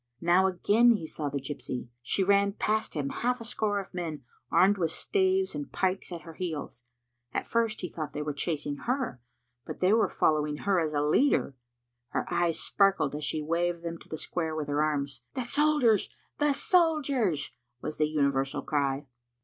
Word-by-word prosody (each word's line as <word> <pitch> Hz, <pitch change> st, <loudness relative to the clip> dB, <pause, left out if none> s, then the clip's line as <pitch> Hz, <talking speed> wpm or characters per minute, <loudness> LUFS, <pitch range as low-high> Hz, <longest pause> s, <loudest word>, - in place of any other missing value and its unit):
Now 175 Hz, +3 st, +4 dB
again 215 Hz, +6 st, +4 dB
he 180 Hz, -, -5 dB
saw 155 Hz, -2 st, -4 dB
the 140 Hz, -, -3 dB
gypsy. 130 Hz, -3 st, -5 dB
She 160 Hz, +10 st, 0 dB
ran 200 Hz, +1 st, +3 dB
past 215 Hz, -1 st, -1 dB
him, 140 Hz, -2 st, -1 dB
half 250 Hz, -, -1 dB
a 230 Hz, -, -7 dB
score 215 Hz, -3 st, 0 dB
of 195 Hz, -, -8 dB
men, 160 Hz, -6 st, -4 dB, 0.3 s
armed 190 Hz, +4 st, +4 dB
with 165 Hz, -2 st, +1 dB
staves 380 Hz, -, +1 dB
and 290 Hz, -1 st, -5 dB
pikes, 190 Hz, 0 st, -1 dB
at 170 Hz, -2 st, -5 dB
her 165 Hz, -, -10 dB
heels. 155 Hz, -8 st, -5 dB, 0.5 s
At -, -, 0 dB
first 230 Hz, -1 st, 0 dB
he 180 Hz, -, -2 dB
thought 155 Hz, -2 st, -5 dB
they 150 Hz, -, -4 dB
were 150 Hz, 0 st, -3 dB
chasing 145 Hz, -1 st, -2 dB
her, 250 Hz, -, -1 dB, 0.4 s
but -, -, -7 dB
they 185 Hz, +3 st, +4 dB
were 225 Hz, -, +3 dB
following 150 Hz, -1 st, +1 dB
her 195 Hz, -2 st, +3 dB
as 155 Hz, -2 st, -1 dB
a 145 Hz, 0 st, +1 dB
leader. 150 Hz, -, +2 dB, 0.5 s
Her -, -, -2 dB
eyes 170 Hz, -1 st, +1 dB
sparkled 195 Hz, -8 st, +2 dB
as 150 Hz, +1 st, -4 dB
she 150 Hz, +1 st, -1 dB
waved 170 Hz, +2 st, -1 dB
them 170 Hz, -1 st, -5 dB
to -, -, -17 dB
the 160 Hz, -, -4 dB
square 160 Hz, 0 st, -2 dB
with 150 Hz, -2 st, -3 dB
her 145 Hz, +1 st, +1 dB
arms. 140 Hz, -4 st, -1 dB
"The 255 Hz, -, -1 dB
soldiers, 285 Hz, -6 st, +3 dB, 0.3 s
the 295 Hz, -1 st, +3 dB
soldiers!" 285 Hz, -, +2 dB, 0.3 s
was 155 Hz, -, -5 dB
the 155 Hz, 0 st, +2 dB
universal 140 Hz, -3 st, 0 dB
cry. 140 Hz, -1 st, 0 dB
170 Hz, 185 wpm, -29 LUFS, 150-215 Hz, 0.5 s, Now